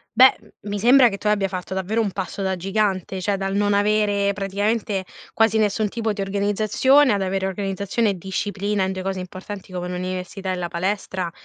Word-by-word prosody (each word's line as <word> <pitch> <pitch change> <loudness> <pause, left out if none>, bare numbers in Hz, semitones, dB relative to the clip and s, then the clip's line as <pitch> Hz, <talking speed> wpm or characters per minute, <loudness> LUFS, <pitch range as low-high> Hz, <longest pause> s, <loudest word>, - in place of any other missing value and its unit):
Beh, 260 +3 +8 0.3
mi 205 0 -2
sembra 245 +3 +6
che 200 - -5
tu - - -16
abbia 210 -2 +2
fatto 185 0 -5
davvero 190 +4 -1
un 210 -4 0
passo 195 +1 -4
da 190 0 0
gigante, 190 0 -1
cioè 200 +2 0
dal 195 0 -2
non 205 0 +2
avere 205 -1 +2
praticamente 200 0 -1 0.3
quasi 225 -1 +3
nessun 210 0 +1
tipo 225 0 -2
di 200 - -4
organizzazione, 210 +7 +3
ad 200 -1 0
avere 190 0 -1
organizzazione 200 +3 -1
e 195 - -2
disciplina, 200 +1 -2
in 190 - -1
2 190 0 -4
cose 190 0 -3
importanti 185 +1 -8
come 180 0 -3
l'università 185 +1 -4
e - - -1
la 180 -1 -3
palestra 185 0 -2
200 Hz, 190 wpm, -22 LUFS, 190-210 Hz, 0.3 s, Beh